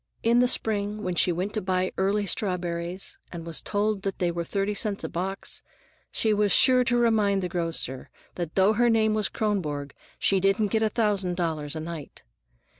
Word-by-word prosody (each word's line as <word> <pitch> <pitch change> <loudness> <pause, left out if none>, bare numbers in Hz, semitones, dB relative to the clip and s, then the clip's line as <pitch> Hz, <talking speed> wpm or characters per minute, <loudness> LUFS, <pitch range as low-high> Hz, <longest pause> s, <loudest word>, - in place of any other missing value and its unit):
In 235 +1 +4
the 250 - +4
spring, 210 -2 0
when 180 - -1
she 175 - +3
went 185 +4 -2
to 215 - -1
buy 185 0 0
early 200 +2 +1
strawberries, 180 -2 -2
and 170 -2 -7
was 165 -1 -3
told 210 0 -1
that 195 -1 -3
they 175 -1 0
were 170 0 -3
thirty 200 +4 -1
cents 205 -2 -1
a - - -3
box, 190 +3 -4 0.5
she 220 -1 +1
was 205 -1 +2
sure 255 -1 +6
to 240 0 +2
remind 215 -5 +2
the - - 0
grocer 165 -7 -2 0.2
that 170 -3 -5
though 195 +2 +4
her 240 +2 +3
name 220 -1 +3
was 215 -2 0
Kronborg 150 -10 -2 0.2
she 195 - +2
didn't 195 +2 +2
get 220 +1 +1
a 220 - +2
thousand 205 -5 0
dollars 160 -4 -2
a - - -3
night. 160 -2 -8
195 Hz, 190 wpm, -26 LUFS, 175-215 Hz, 0.5 s, sure